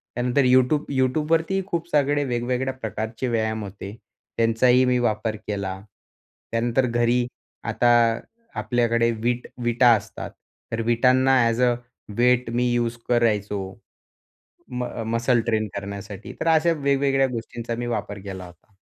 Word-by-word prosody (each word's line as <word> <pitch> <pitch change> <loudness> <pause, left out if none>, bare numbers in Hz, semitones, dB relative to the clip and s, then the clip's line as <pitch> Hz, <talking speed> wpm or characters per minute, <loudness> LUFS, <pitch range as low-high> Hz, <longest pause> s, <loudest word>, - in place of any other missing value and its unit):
त्यानंतर 125 +3 +1
YouTube 130 +4 +3
YouTubeवरतीही 160 +8 +1
खूप 170 -3 -3
सगळे 145 -1 +2
वेगवेगळ्या 125 +2 -1
प्रकारचे 110 0 -4
व्यायाम 110 -2 -1
होते. 100 +1 -8 0.4
त्यांचाही 120 +3 +4
मी 125 0 +2
वापर 110 -2 0
केला. 95 -2 -3 0.7
त्यानंतर 120 +3 +1
घरी 120 0 +1 0.5
आता 120 - +1 0.7
आपल्याकडे 115 -1 +1
विट 120 +1 -1 0.2
विटा 120 +1 +4
असतात, - - -8 0.4
तर 115 0 -1
विटांना 130 +2 +4
as 115 +2 -1
a 125 -1 +4 0.4
weight 125 0 +3
me 125 0 +1
use 120 -1 0
करायचो 105 -4 +1 1.1
म 125 0 -3
अ, 115 - -5
मसल 115 +2 +1
ट्रेन 110 -2 0
करण्यासाठी. 100 0 -7
तर - - -2
अशा 165 +1 +4
वेगवेगळ्या 140 -2 +2
गोष्टींचा 115 0 -5
मी 120 - -3
वापर 105 -3 -3
केला 95 -2 -6
होता. 90 +3 -18
120 Hz, 130 wpm, -23 LUFS, 110-130 Hz, 1.1 s, त्यांचाही